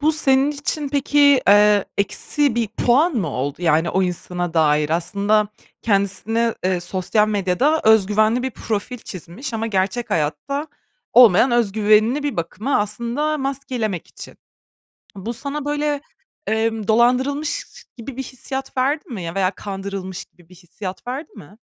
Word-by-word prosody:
Bu 310 +2 +3
senin 275 -2 +3
için 290 0 -3
peki, 285 +1 0 0.3
eee, 205 0 +6
eksi 280 +6 +1
bir 230 -2 0
puan 265 - +2
mı 195 -10 -1
oldu, 140 +5 -4
yani, 165 0 +2
o 190 - +1
insana 175 -1 -3
dair? 150 -2 +2
Aslında 200 +5 +1 0.3
kendisine, 225 +3 +1
eee, 185 -1 +1
sosyal 190 +4 0
medyada 210 - +1
öz 220 -3 +5
güvenli 215 +4 +2
bir 260 - -2
profil 225 +2 -4
çizmiş 205 - -8
ama 225 0 -2
gerçek 205 +3 -1
hayatta 165 - -2 0.5
olmayan 235 0 +7
öz 235 -5 +2
güvenini 215 +6 +3
bir 285 -8 -3
bakıma 205 +10 -1
aslında 235 +9 -2
maskelemek 255 - -3
için. - - -12 0.8
Bu 210 +5 -5
sana, 280 +4 -5
böyle, 295 0 -1 0.5
emm, 220 -1 -1
dolandırılmış 255 +6 +1 0.3
gibi 240 +2 -8
bir 265 - -3
hissiyat 265 +2 -7
verdi 285 +5 0
mi? 200 -7 -6
Ya, 165 +2 -6
veya 190 -1 +1
kandırılmış 195 -1 -6
gibi 175 -1 -25
bir 185 - -16
hissiyat 185 +4 -9
verdi 275 - -5
mi? 185 +8 -14
220 Hz, 145 wpm, -21 LUFS, 190-265 Hz, 0.8 s, olmayan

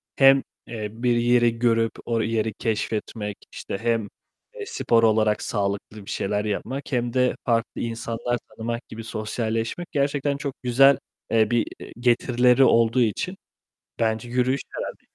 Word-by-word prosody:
hem, 135 0 +6 0.2
eee, 110 -3 -4
bir 120 +1 0
yeri 120 -1 +3
görüp 115 -1 +2
o 115 -1 0
yeri 110 -1 0
keşfetmek, 105 -1 -3
işte, - - -5
hem, 115 -3 0 0.5
eee, 425 -3 -6
spor 115 - +1
olarak 110 -1 +3
sağlıklı 100 0 -3
bir - - -10
şeyler 105 +2 -1
yapmak 130 +8 -4
hem 120 -2 0
de 125 -1 +2
farklı 115 -2 0
insanlar 115 +1 -2
tanımak 115 +2 -5
gibi, 115 +1 -8
sosyalleşmek 115 +7 -3
gerçekten 140 0 0
çok 140 -2 -4
güzel, 135 +3 +6 0.3
eee, 110 -1 +3
bir 120 -1 +2 0.3
getirileri 125 +1 +4
olduğu 115 0 +4
için 150 - -1 0.6
bence 110 +1 0
yürüyüş 125 +2 +1
herhâlde. - - -6
115 Hz, 140 wpm, -24 LUFS, 110-125 Hz, 0.6 s, hem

